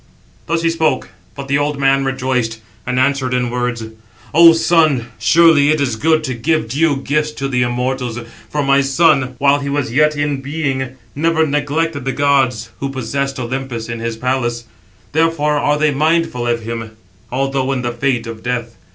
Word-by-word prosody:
Thus 165 +1 0
he 165 - +2
spoke; 160 -9 0 0.3
but 140 -1 -7
the 140 +1 +1
old 145 0 -1
man 135 0 +3
rejoiced, 130 -4 -1 0.3
and 125 0 0
answered 130 -1 +1
in 125 -1 -1
words: 125 -2 -2 0.5
"O 165 +2 +8
son, 160 -7 +2
surely 155 +3 +5
it 155 0 +2
is 130 -5 0
good 155 +6 +2
to 130 - -2
give 130 +1 0
due 145 +4 +1
gifts 150 +2 -1
to 135 -2 -3
the 125 -2 0
immortals, 125 0 -2 0.3
for 150 -1 -1
my 140 0 +3
son, 135 -2 +2
while 140 +2 +3
he 140 0 -4
was 140 -4 -2
yet 150 +3 +3
in 145 -2 -1
being, 135 -3 -3 0.2
never 160 +2 +1
neglected 145 0 -1
the 135 - -1
gods 135 -5 +1
who 140 - -3
possess 135 +1 -3
Olympus, 125 -2 -4
in 115 -1 -4
his 115 0 -4
palace; 120 -1 -1 0.5
therefore 150 -2 +1
are 145 +1 +1
they 150 0 +2
mindful 155 -4 0
of 115 -1 -1
him, 115 -1 -6 0.3
although 135 +1 -1
in 130 -2 -2
the 120 - -1
fate 125 0 -1
of 115 -1 -8
death. 120 -1 -4
135 Hz, 175 wpm, -17 LUFS, 125-150 Hz, 0.5 s, O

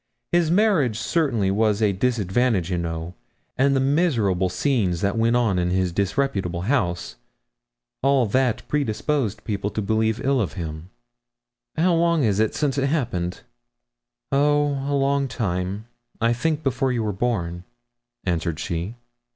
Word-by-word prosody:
His 175 -2 +3
marriage 175 - +3
certainly 120 - +1
was 105 0 +2
a 105 -3 +2
disadvantage, 105 -2 +1
you 90 - 0
know, 85 0 -4 0.4
and 140 +1 +3
the - - +3
miserable 130 - +2
scenes 95 - 0
that 100 +1 0
went 115 +1 +2
on 110 -7 +2
in 90 0 0
his 90 0 +1
disreputable 100 -3 -1
house 90 -6 -1 0.8
all 135 -2 +3
that 125 +2 0
predisposed 130 -5 -1
people 100 -2 -2
to 110 - -4
believe 110 +2 0
ill 135 -2 +2
of 85 -10 -2
him.' 80 +1 -6 0.9
'How 175 +3 +3
long 170 -2 +2
is 105 -3 +2
it 110 -1 +1
since 145 -2 0
it 135 - +1
happened?' 95 - -2 0.9
'Oh, 145 0 +2
a - - +2
long 140 0 +1
time; 95 -3 -3 0.3
I 115 0 +2
think 155 +5 -1
before 135 0 0
you 120 -3 -1
were 105 - -1
born,' 90 -6 -2 0.6
answered 85 -3 -1
she. 85 +7 -3
110 Hz, 145 wpm, -23 LUFS, 95-140 Hz, 0.9 s, His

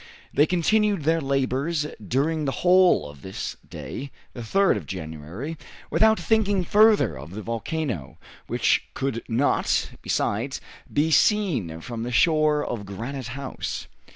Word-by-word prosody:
They 145 +3 +4
continued 200 +1 +2
their 165 +2 +2
labors 140 +3 0 0.2
during 150 - 0
the 135 - 0
whole 180 - +5
of 75 -1 -13
this 95 +3 -5
day, 140 +2 -6 0.2
the 120 - -7
3rd 195 - +2
of 95 - -6
January, 90 - -6 0.3
without 220 0 +4
thinking 205 -4 +2
further 215 - +4
of 75 +8 -9
the 110 - -5
volcano, 115 - -3 0.3
which - - +1
could 135 -4 -2
not, 120 +5 +1
besides, 120 +6 -1 0.3
be 155 +2 +1
seen 145 - +2
from 115 +5 -6
the 120 +2 -3
shore 155 +1 +3
of 115 -4 -4
Granite 115 +6 -6
House. 140 -2 -5
140 Hz, 135 wpm, -25 LUFS, 110-165 Hz, 0.3 s, whole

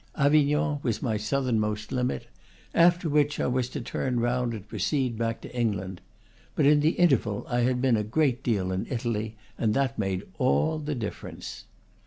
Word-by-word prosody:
Avignon 150 +1 +3
was 115 -5 -2
my 115 -4 0
southernmost 110 -2 -1
limit; 125 -1 -1 0.5
after 170 0 +4
which 150 0 +2
I - - +1
was 125 0 0
to 140 - -5
turn 125 +1 -2
round 120 0 0
and 105 -1 -9
proceed 120 +4 -1
back 115 0 -2
to - - -10
England. 100 -6 -2 0.5
But 150 - +2
in 145 +1 +6
the 155 +3 +3
interval 125 -11 +2
I 120 - 0
had 125 +1 +1
been 130 -3 +4
a 105 - 0
great 130 +3 +1
deal 100 -7 0
in 95 +1 -2
Italy, 115 -3 -2 0.2
and 110 -2 +1
that 135 -4 0
made 95 -2 -1 0.2
all 75 - +2
the 150 -1 -3
difference. 110 -4 -6
125 Hz, 175 wpm, -27 LUFS, 110-140 Hz, 0.5 s, in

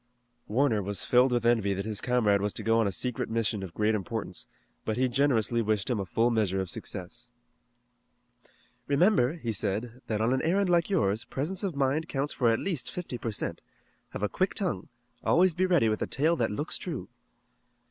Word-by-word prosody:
Warner 115 -1 +2
was 100 0 -2
filled 125 +1 +4
with 120 -1 0
envy 110 -4 +3
that 100 +2 -3
his 110 -2 -2
comrade 110 -5 +2
was 105 0 -1
to - - -5
go 115 0 +3
on 110 - +3
a - - 0
secret 125 +5 -2
mission 115 -2 0
of 95 -3 -8
great 110 +1 +2
importance, 105 -2 -4 0.4
but 110 - -2
he 130 +1 +3
generously 120 -3 +2
wished 110 +1 0
him 115 - 0
a 95 - -3
full 115 +6 +2
measure 105 -4 +1
of 95 -3 -3
success. - - -7 1.6
"Remember," 145 - +3
he 125 -10 -4
said, 110 +5 -3
"that 110 -2 -1
on 115 +3 +2
an 130 - +1
errand 185 +3 +2
like 170 0 +3
yours, 110 - +1
presence 155 +11 -3
of 190 -6 -2
mind 140 +4 0
counts 140 +1 -2
for 120 -3 +2
at 115 - +3
least 170 -5 -3
fifty 170 -9 -5
per 115 - -3
cent. 100 - -3 0.5
Have - - -6
a - - +3
quick - - -1
tongue. - - -2 0.4
Always 180 +1 +4
be 185 +3 +1
ready 175 -10 +4
with 110 0 0
a - - 0
tale 155 +5 +2
that 115 -8 0
looks 145 +10 -3
true." 165 -7 -5
120 Hz, 200 wpm, -28 LUFS, 105-145 Hz, 1.6 s, filled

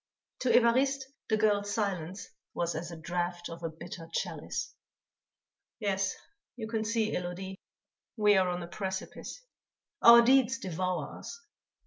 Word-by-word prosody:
To 255 - 0
Évariste 265 +4 +4 0.3
the 220 - +3
girl's 205 -1 +2
silence 190 -4 -2 0.3
was 170 0 0
as 170 - -4
a 170 - -8
draught 175 +1 -3
of 165 - -8
a 165 - -2
bitter 165 +1 -9
chalice. - - -3 1.1
"Yes, 195 -3 0 0.4
you 225 -3 -5
can 220 -1 -1
see, 220 0 0
Élodie, 180 +2 -4 0.6
we 210 -1 +5
are 185 -1 +3
on 175 0 -2
a - - -7
precipice; 190 - -5 0.6
our 235 0 +10
deeds 260 0 +4
devour 185 - -3
us. 280 - -8
195 Hz, 135 wpm, -30 LUFS, 175-225 Hz, 1.1 s, our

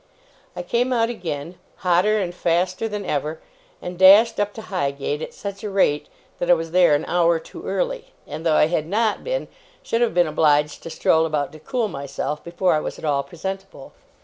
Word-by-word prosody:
I 180 - -4
came 240 +7 0
out 230 -1 +2
again, 170 -5 -6 0.3
hotter 185 +5 +3
and 180 -3 -2
faster 180 +4 0
than 210 -1 -5
ever, 150 +2 -2 0.4
and 180 0 -6
dashed 205 +5 +7
up 205 0 0
to 220 - -8
Highgate, 145 -6 -2
at - - -5
such 200 -1 -7
a 210 - -3
rate 190 -7 +1 0.3
that 175 - -2
I 175 - +8
was 165 -1 -5
there 175 -4 +5
an 145 - -2
hour 170 -1 +2
too 345 - -10
early; - - -2 0.2
and, 155 +2 -7
though 160 -2 +2
I - - +6
had 155 -1 -1
not 215 +3 0
been, - - -2 0.4
should 230 - -1
have 235 -7 +1
been 175 -1 +5
obliged 150 -1 +2
to - - -8
stroll 160 0 +2
about 150 -3 -2
to 155 - -12
cool 230 - -1
myself, 140 -2 -5
before 175 +2 0
I 155 - +2
was - - -5
at - - -8
all 145 -2 +1
presentable. 190 +5 -7
175 Hz, 200 wpm, -22 LUFS, 155-205 Hz, 0.4 s, I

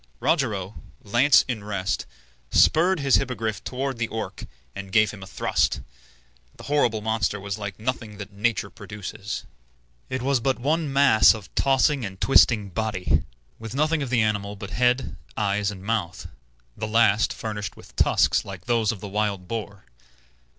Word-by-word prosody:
Rogero, 110 - -1 0.2
lance 120 +7 +4
in 120 -5 -3
rest, 100 -2 -2 0.4
spurred 175 - +4
his 135 -2 +4
Hippogriff 115 -6 -3
toward 130 -1 -3
the 115 - 0
Orc, 110 -4 -5 0.3
and 100 -1 -7
gave 110 +1 +4
him 105 - -11
a 95 - -9
thrust. - - 0 0.8
The - - -12
horrible 120 -7 +1
monster 110 -1 0
was 100 +2 -5
like 100 -1 -6
nothing 115 -2 -4
that 100 0 -9
nature 100 -1 -1
produces. 105 0 -7 0.7
It 130 -1 -3
was 135 -1 +2
but 130 +2 0
one 150 +4 0
mass 135 -6 +6
of 105 -3 -11
tossing 135 0 +2
and 95 -2 -6
twisting 110 -6 +4
body, 95 -6 0 0.4
with 115 +2 -7
nothing 155 +2 +1
of 135 - -3
the 120 -3 +3
animal 105 -1 -1
but 100 0 -8
head, 125 +3 +1 0.2
eyes, 105 -1 0
and 95 -3 -8
mouth, 100 -6 -2 0.5
the 110 - -4
last 110 -1 +3
furnished 105 -3 -5
with - - -15
tusks - - +3
like 95 -3 -9
those 115 -3 +2
of 105 -4 -8
the 105 - -6
wild 100 -2 -2
boar. 105 -2 -6
110 Hz, 160 wpm, -24 LUFS, 100-125 Hz, 0.8 s, mass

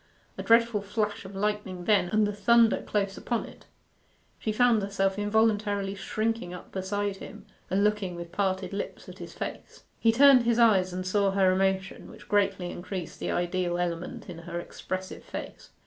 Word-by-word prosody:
A - - -5
dreadful 230 -2 +4
flash 210 +1 -2
of 195 +1 -9
lightning 195 -3 -2
then, 205 -5 +3
and 215 +1 +3
the 205 - -2
thunder 225 +2 +4
close 200 -2 -2
upon 235 -2 -2
it. - - -15 0.7
She 215 - -1
found 235 0 +3
herself 195 0 0
involuntarily 205 -2 +1
shrinking 215 -2 -2
up 180 - -12
beside 200 +1 -2
him, - - -11 0.2
and 195 +2 +2
looking 210 -4 0
with 170 0 -8
parted 190 -1 -1
lips 200 - -5
at - - -11
his - - -8
face. - - -7 0.2
He 225 - +4
turned 270 +2 +7
his 235 -1 +1
eyes 200 -6 +4
and 185 +1 -4
saw 200 +1 +2
her 195 -1 +3
emotion, 190 0 -1
which - - -14
greatly 195 -3 +1
increased 180 -1 -6
the - - -3
ideal 175 0 -1
element 175 0 -4
in 170 -2 -8
her 170 0 -5
expressive 185 +2 -6
face. - - -8
200 Hz, 175 wpm, -28 LUFS, 185-215 Hz, 0.7 s, turned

